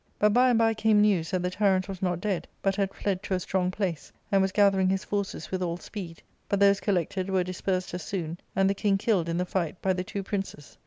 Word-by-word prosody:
" - - -41
But 210 0 +4
by 250 +2 +5
and 240 - +3
by 225 0 +3
came 220 -1 +3
news 195 -6 +3
that 185 -1 -1
the 180 - -1
tyrant 190 -2 +2
was 190 -2 -7
not 180 -2 0
dead, 195 -2 -2 0.2
but 195 -1 +2
had 195 -1 0
fled 195 -2 -2
to 190 - -2
a - - -1
strong 180 0 0
place, 185 -5 -3 0.2
and 195 -1 +4
was 190 0 +1
gathering 195 -2 +4
his 190 0 0
forces 200 -1 -3
with 185 -1 -2
all 170 -1 -1
speed; 180 -3 -8 0.3
but 200 - +1
those 200 0 +5
collected 185 0 -1
were 190 -1 +2
dispersed 185 0 -2
as 180 - -3
soon, 170 -1 -4 0.2
and 195 0 +3
the 195 - +2
king 200 0 +1
killed 195 -5 +1
in 165 - -1
the 180 - 0
fight 175 -2 -2
by 190 - +1
the 180 0 -2
two 200 +2 -5
princes. 195 -8 -5
190 Hz, 255 wpm, -27 LUFS, 180-200 Hz, 0.3 s, by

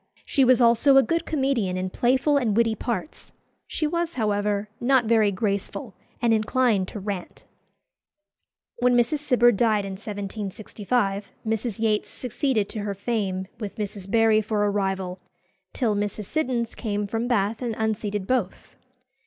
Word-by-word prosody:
She 275 - +2
was 255 -1 +5
also 240 +4 +5
a 270 - +7
good 335 +2 -1
comedian 265 -11 0
in 185 0 -3
playful 265 +7 +2
and 230 -7 +1
witty 230 -1 +3
parts. 235 +7 -5 0.3
She 310 - -2
was, 340 +2 -1
however, 205 -2 0
not 255 0 +3
very 220 -2 +3
graceful, 200 +3 -3 0.3
and 235 -2 +3
inclined 220 -3 +2
to 210 - -7
rant. 195 -2 -6 1.4
When 245 0 +3
Mrs. 240 +5 +2
Cibber 250 -4 +4
died 215 -2 +2
in 195 - -5
1765, 205 +1 -3
Mrs. 220 -1 -2
Yates 220 -1 0
succeeded 250 -4 -1
to 220 - -5
her 205 -1 -3
fame, 195 -3 -2
with 210 -3 -5
Mrs. 200 -2 -5
Barry 225 0 +4
for 210 -1 -1
a 205 - +1
rival, 190 -2 -2 0.5
till 235 -5 0
Mrs. 205 0 -3
Siddons 250 -4 -1
came 210 -3 -2
from 225 +3 -2
Bath 215 -2 0
and 235 -3 -2
unseated 210 -2 -2
both. 225 -5 -2
220 Hz, 150 wpm, -25 LUFS, 205-245 Hz, 1.4 s, a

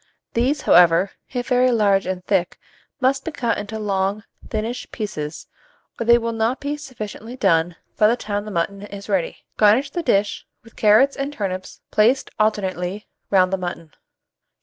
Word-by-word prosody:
These, 265 +5 +1
however, 175 +2 +5 0.2
if 245 -2 -3
very 250 0 +4
large 205 -5 +2
and 185 -1 -4
thick, 185 -3 0 0.4
must 270 +1 +1
be - - -3
cut 235 -6 -1
into 210 +2 -5
long 200 0 -1 0.3
thinnish 225 +3 -3
pieces, 160 -8 -5 0.5
or 230 - -3
they 235 0 +7
will 230 0 -2
not 225 +3 0
be 290 +1 -3
sufficiently 245 -4 -8
done 170 -6 +2 0.2
by 210 - +5
the 235 +3 +2
time 205 -2 -3
the - - -6
mutton 195 +2 -2
is 200 -1 -9
ready. 190 -4 -1
Garnish 225 +7 +4
the 345 - -2
dish 205 -10 0 0.2
with 230 - -18
carrots 220 +6 +4
and 275 +1 -3
turnips 190 -8 -5
placed 235 +6 +3
alternately 200 -2 -1 0.2
round 185 -1 +3
the 190 - 0
mutton. 170 -3 -6
210 Hz, 165 wpm, -21 LUFS, 190-245 Hz, 0.5 s, they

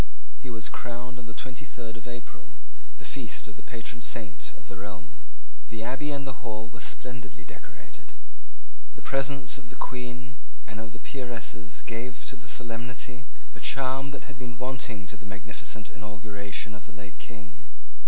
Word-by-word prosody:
He 130 - -2
was 110 -3 +1
crowned 125 +1 -1
on 115 - -5
the - - -2
twenty 130 +1 0
third 120 -5 -3
of 115 +1 -5
April, 120 0 -5 0.4
the - - -7
feast - - +1
of 105 - -5
the 105 - -7
patron 115 +1 -2
saint 110 - +1
of - - -12
the 100 - -4
realm. 95 -7 -3 0.6
The 110 0 +1
Abbey 135 +4 +4
and 140 -1 +4
the 130 -2 0
Hall 110 -2 0
were 115 - -5
splendidly 115 -15 0
decorated. - - -9 0.8
The - - -7
presence 135 -1 +5
of 120 - -10
the 130 - -5
Queen 125 +2 +1 0.3
and 110 -1 -2
of 110 -1 -3
the 115 - -4
peeresses 115 -5 0
gave 120 +2 +1
to - - +3
the 115 -2 -8
solemnity 125 +2 0 0.3
a - - -7
charm 135 +1 +6
which 140 - -2
had 140 -3 -6
been 120 -2 0
wanting 125 -6 +2
to 105 +4 -3
the 100 - -4
magnificent 105 +1 -1
inauguration 105 -2 0
of 105 0 -5
the - - -7
late 100 -1 -5
King. 100 -7 -6
115 Hz, 175 wpm, -35 LUFS, 105-125 Hz, 0.8 s, charm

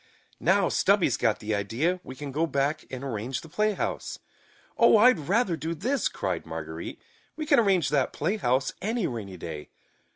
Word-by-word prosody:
"Now, - - +3
Stubby's - - +3
got - - +1
the 110 0 -3
idea, 115 - 0
we 130 - -9
can 140 +1 -6
go 160 +5 0
back 140 +1 -1
and 130 0 -6
arrange 120 0 -3
the 160 - -13
playhouse." 210 +4 -1 0.6
"Oh, 230 -1 +6
I'd 245 -2 +6
rather 200 -4 +2
do 160 +2 -4
this!" 260 - 0
cried - - -3
Marguerite. - - -6 0.4
"We 310 - -4
can 290 -3 +5
arrange 195 -9 +3
that 150 - +1
playhouse 140 - 0
any 220 0 -1
rainy 105 - -5
day." 80 -3 -7
155 Hz, 165 wpm, -27 LUFS, 130-210 Hz, 0.6 s, Oh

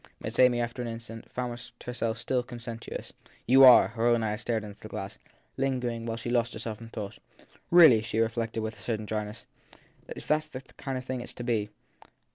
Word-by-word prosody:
Miss 110 +1 -5
Amy, 125 -1 +6
after 120 +1 -3
an 120 - -3
instant, 115 0 -8
found 120 -1 -4 0.2
herself 120 -2 -2
still 125 +2 0
conscientious. 120 -2 -7 0.3
You 135 +3 +7
are. 125 -2 +9
Her 115 +1 0
own 120 -1 +3
eyes 105 +1 -2
strayed 115 -3 -1
to 105 -1 -8
the - - -11
glass, - - -6 0.4
lingering 125 -3 -1
there 115 - -7
while 115 - -2
she 120 +1 -4
lost 120 -1 +1
herself 110 0 -5
in 115 - -9
thought. 105 -2 -6 0.5
Really, 160 -11 +8
she 110 0 -4
reflected 115 0 0
with 110 0 -5
a - - -13
certain 110 -2 -2
dryness, 105 +1 -4 0.3
( - - -32
if - - -9
that 155 - +4
s 155 0 -7
the 130 -4 -8 0.2
kind 135 -2 -4
of 130 - -6
thing 130 -1 -3
it - - -6
s - - -7
to 120 - -7
be 110 -4 0
115 Hz, 220 wpm, -28 LUFS, 110-125 Hz, 0.5 s, are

